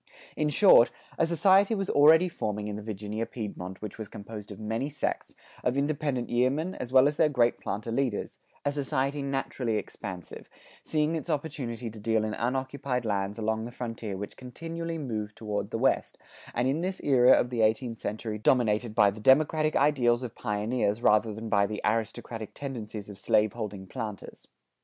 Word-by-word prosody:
In 150 -1 +1
short, 150 - +7 0.3
a 165 - +3
society 190 +6 +4
was 195 -2 -2
already 160 +5 +6
forming 105 - -3
in 105 - -4
the 105 - -6
Virginia 105 +1 -4
Piedmont 95 -4 -6
which 105 +1 -7
was 110 - -5
composed 105 0 -9
of 100 - -9
many 110 +6 -2
sects, 145 -1 -3 0.3
of 125 +2 +1
independent 140 -3 -1
yeomen 135 +9 +1
as 125 - -6
well 130 +1 +7
as 145 0 -1
their 155 - +4
great 120 -4 +2
planter 105 +3 -4
leaders 120 -3 -2 0.3
a 145 - +2
society 140 0 -1
naturally 135 -4 -2
expansive, 90 -4 -7 0.3
seeing 155 +1 0
its 160 +2 -5
opportunity 135 -7 -3
to 110 - -11
deal 110 +1 +1
in 110 0 -2
unoccupied 130 +1 -2
lands 100 0 -1
along 110 0 -1
the 120 - -7
frontier 115 -5 -5
which 100 +1 -7
continually 165 +6 -5
moved 110 -8 -4
toward 105 -2 -3
the - - -2
West, - - +1 0.4
and 120 +2 +1
in 140 +5 0
this 185 +1 -2
era 130 -2 +6
of 120 - +2
the 120 -2 0
eighteenth 115 +1 +1
century 105 0 -4
dominated 110 -1 +2
by 105 -3 +5
the 105 +2 -10
democratic 155 +5 +4
ideals 130 -4 +3
of 120 -3 -5
pioneers 105 0 -1
rather 110 +1 +4
than 110 +2 -6
by 100 -2 +3
the 105 0 -4
aristocratic 110 0 -2
tendencies 110 -7 -6
of 100 -3 -10
slaveholding 105 -1 0
planters. 105 -1 -7
120 Hz, 175 wpm, -28 LUFS, 105-140 Hz, 0.4 s, short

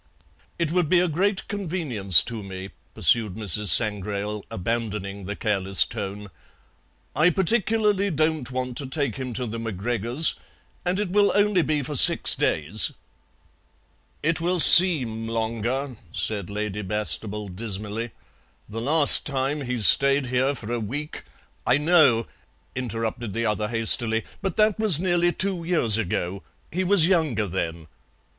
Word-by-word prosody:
"It 170 -3 -2
would 175 -3 0
be 180 - +3
a 180 - +1
great 190 +5 -2
convenience 155 - +2
to 115 -2 -7
me," 95 -1 -9 0.2
pursued 110 -5 +2
Mrs. 105 -1 0
Sangrail, 105 +1 +1
abandoning 100 -1 -5
the 100 +2 -6
careless 95 -4 +1
tone. 100 -2 -8 0.8
"I 160 +3 +3
particularly 205 +2 +1
don't 155 -5 -2
want 125 -1 -5
to 140 - -3
take 135 -5 -3
him 130 -1 -6
to 125 - -4
the 115 0 -7
MacGregors', 115 - -1 0.5
and 180 +2 -2
it 205 -4 -3
will 205 +1 +2
only 205 -2 +2
be 150 -2 -2
for 145 +3 -6
six - - +8
days." 85 +8 +1 1.3
"It 165 +2 -1
will 175 +1 -1
seem 130 -12 +6
longer," 115 +3 -4
said 105 -4 -3
Lady 105 0 -5
Bastable 105 +1 -3
dismally. 105 +3 -6 0.6
"The 110 +2 -7
last 145 +4 +4
time 140 +1 -3
he 125 -2 -4
stayed 140 +5 +4
here 130 +3 -1
for 115 -1 -7
a 120 - -2
week 145 +8 -7 0.2
" - - -24
"I - - +3
know," 145 -7 +2 0.5
interrupted 115 -3 -5
the 115 0 -3
other 105 -1 -2
hastily, 115 0 +2 0.2
"but 195 -3 -5
that 215 -1 +1
was 210 -8 +5
nearly 175 -1 0
two 190 -2 -2
years 125 - +2
ago. 95 -1 -4 0.3
He 185 +4 -2
was 185 -3 +4
younger 155 - 0
then." 85 -3 -5
120 Hz, 145 wpm, -23 LUFS, 105-160 Hz, 1.3 s, six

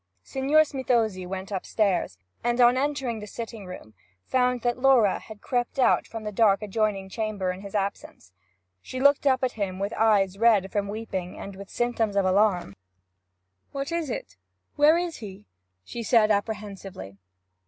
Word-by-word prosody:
Signor 270 - +3
Smithozzi 235 -10 -1
went 190 +2 -6
upstairs, 190 - 0 0.3
and 240 +1 0
on 245 0 +6
entering 270 -4 -1
the 210 - -8
sitting 225 -2 -7
room 145 -12 -10 0.3
found 250 -1 +1
that 240 0 0
Laura 250 -6 +4
had 220 -2 -12
crept 245 -1 -1
out 260 - +3
from 225 -1 -7
the 210 - -4
dark 210 -1 +3
adjoining 210 -2 -1
chamber 205 -2 -2
in 180 +1 -8
his 200 0 -9
absence. 195 - -4 0.5
She 255 - -6
looked 280 +1 +4
up 260 -1 +3
at 255 - +1
him 195 -5 -3
with 200 +2 -3
eyes 200 -3 +2
red 215 -4 +4
from 205 -1 -1
weeping, 200 -4 -5
and 195 0 -8
with 195 0 -10
symptoms 235 -4 -1
of 200 -1 +2
alarm. 185 - +2 1.0
'What 275 +3 -4
is 335 -4 -2
it? 95 - -6 0.4
where 300 +3 +5
is 345 -2 -3
he?' 205 -1 -10 0.4
she 235 - -6
said 220 -1 +4
apprehensively. 200 - -4
215 Hz, 165 wpm, -26 LUFS, 195-245 Hz, 1.0 s, on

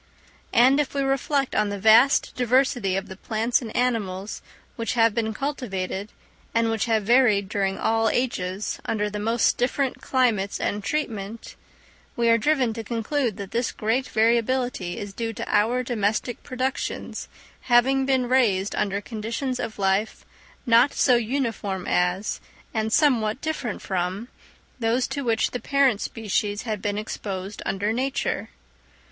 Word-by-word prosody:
And 260 +4 +5
if 285 -1 -1
we 275 - +1
reflect 270 0 0
on 210 -1 +1
the 200 - -3
vast 220 +7 +5
diversity 245 -5 +2
of 195 +1 -2
the 190 - -8
plants 225 +5 0
and 225 -3 -7
animals 210 -5 -1 0.3
which 230 +1 -2
have 230 -2 +4
been 220 -1 -1
cultivated, 210 -7 -3 0.5
and 230 0 +2
which 225 -2 0
have 220 -2 +1
varied 220 -3 +4
during 195 -1 -1
all 225 0 +2
ages 200 -6 -2
under 210 -1 -1
the 210 - -4
most 225 +2 +2
different 260 +2 0
climates 230 -7 +1
and 205 0 -2
treatment, 225 -6 -4 0.6
we 235 -1 +2
are 230 0 +5
driven 260 -3 +2
to 225 0 -5
conclude 235 +1 -1
that 195 -1 -7
this 235 +1 0
great 230 +5 -1
variability 230 -4 +1
is 205 -1 -6
due 225 +1 -3
to - - -6
our 235 +5 +2
domestic 225 0 -1
productions 260 +1 -3 0.4
having 260 +3 +4
been 260 -2 +2
raised 215 -7 +2
under 200 0 -1
conditions 235 +4 -4
of 230 -3 -4
life 195 +2 0 0.4
not 240 +3 +5
so 255 - +4
uniform 225 -6 -2
as, 180 +3 0 0.3
and 220 0 -1
somewhat 240 -6 +3
different 295 -8 -4
from, 190 +5 -2 0.5
those 235 +2 +1
to 280 +1 -4
which 225 -3 +1
the 245 - -3
parent 275 -7 +2
species 210 -2 -2
had 215 -4 -3
been 205 0 -2
exposed 200 -2 -5
under 200 +3 0
nature. 265 +3 -2
225 Hz, 150 wpm, -24 LUFS, 205-250 Hz, 0.6 s, And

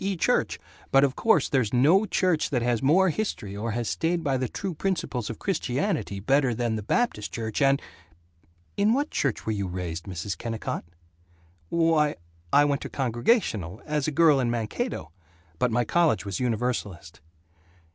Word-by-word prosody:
E. 195 -1 -1
church, - - +1 0.3
but 135 0 +5
of 135 -2 +1
course 220 -11 +3
there's 130 -6 +1
no 170 - +4
church 180 -4 +1
that 125 -4 0
has 120 -2 +1
more 180 +8 +4
history 135 - -4
or 110 +3 -3
has 120 -1 -2
stayed 170 +1 -1
by 140 -3 +1
the 130 -2 -1
true 195 -2 -4
principles 155 - -2
of 115 - -5
Christianity 135 - -1
better 135 +3 +2
than 120 -1 -1
the 110 - -3
Baptist 105 - -1
Church 110 0 -3
and 140 0 +4 1.0
In 205 +2 +3
what 290 +2 -1
church 140 -6 -1
were 110 - 0
you 100 -3 -2
raised, 90 -2 -5
Mrs. 95 0 -4
Kennicott?" 115 -1 -4 0.8
"W 165 -1 +2
why, 150 -2 +2 0.4
I 145 +1 +6
went 140 -1 0
to - - -6
Congregational, 120 - 0
as 150 -2 -1
a - - 0
girl 155 -2 +5
in 125 -2 +1
Mankato, 115 - -3 0.5
but 125 - +2
my 120 +1 +1
college 170 -3 +2
was 100 -2 -3
Universalist." 110 -10 -3
130 Hz, 170 wpm, -26 LUFS, 110-165 Hz, 1.0 s, I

